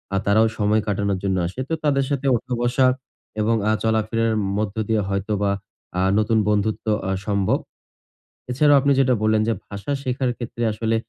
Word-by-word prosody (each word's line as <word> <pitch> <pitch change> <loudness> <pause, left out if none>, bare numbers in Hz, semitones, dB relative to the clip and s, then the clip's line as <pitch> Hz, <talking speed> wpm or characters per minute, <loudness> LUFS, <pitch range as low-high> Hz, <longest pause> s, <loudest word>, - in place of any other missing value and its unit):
আ - - +2
তারাও 110 +3 +4
সময় 105 +1 +2
কাটানোর 100 -1 0
জন্য 95 -1 0
আসে। 95 - -8
তো - - -1
তাদের 140 -2 +2
সাথে 140 -1 -2
উঠা-বসা 125 +2 +1 0.5
এবং 115 +2 +2
আ - - +4
চলাফেরার 110 0 +1 0.2
মধ্য 105 -2 -2
দিয়ে 110 -1 +2
হয়তোবা 100 +1 0 0.5
আ - - +2 0.2
নতুন 110 +1 +2
বন্ধুত্ব 105 +1 0 0.2
আ - - 0 0.2
সম্ভব। 100 -2 +1 0.9
এছাড়া 145 +4 +4
আপনি 140 +1 +2
যেটা 130 -1 +4
বললেন 110 0 +3
যে, 115 - +2
ভাষা 100 +8 -6
শেখার 130 0 -1
ক্ষেত্রে 120 0 -5
আসলে 110 +1 -1
110 Hz, 160 wpm, -22 LUFS, 105-125 Hz, 0.9 s, তারাও